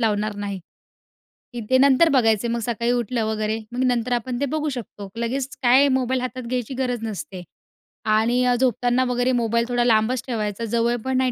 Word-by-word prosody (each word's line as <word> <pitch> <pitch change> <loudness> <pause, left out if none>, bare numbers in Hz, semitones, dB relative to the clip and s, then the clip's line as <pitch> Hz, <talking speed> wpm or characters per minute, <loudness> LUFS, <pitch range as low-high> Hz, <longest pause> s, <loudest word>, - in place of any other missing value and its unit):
लावणार 215 -2 0
नाही, 200 -1 -4 1.0
की 240 - -5
ते 260 - +5
नंतर 275 +4 +5
बघायचे 230 -5 +2
मग 235 0 -1
सकाळी 235 0 -1
उठलं 240 -1 -1
वगैरे 215 0 -1
मग 250 +2 -1
नंतर 245 -1 0
आपण 245 +1 -2
ते - - +2
बघू 310 -1 -1
शकतो. 215 -6 -7
लगेच 250 +3 -2 0.2
काय 260 +3 +6
मोबाईल 255 0 -1
हातात 255 0 -5
घ्यायची 245 +1 -3
गरज 250 -2 -2
नसते. 195 -3 -6 0.6
आणि 225 +3 +2
अ, 245 - +3
झोपताना 245 0 +1
वगैरे 245 +1 +1
मोबाईल 235 +1 +1
थोडा 245 0 +1
लांबच 230 +2 +2
ठेवायचा, 220 -2 -3
जवळ 235 +2 +1
पण 260 -1 0
नाही 260 -1 +2
240 Hz, 180 wpm, -22 LUFS, 225-255 Hz, 1.0 s, काय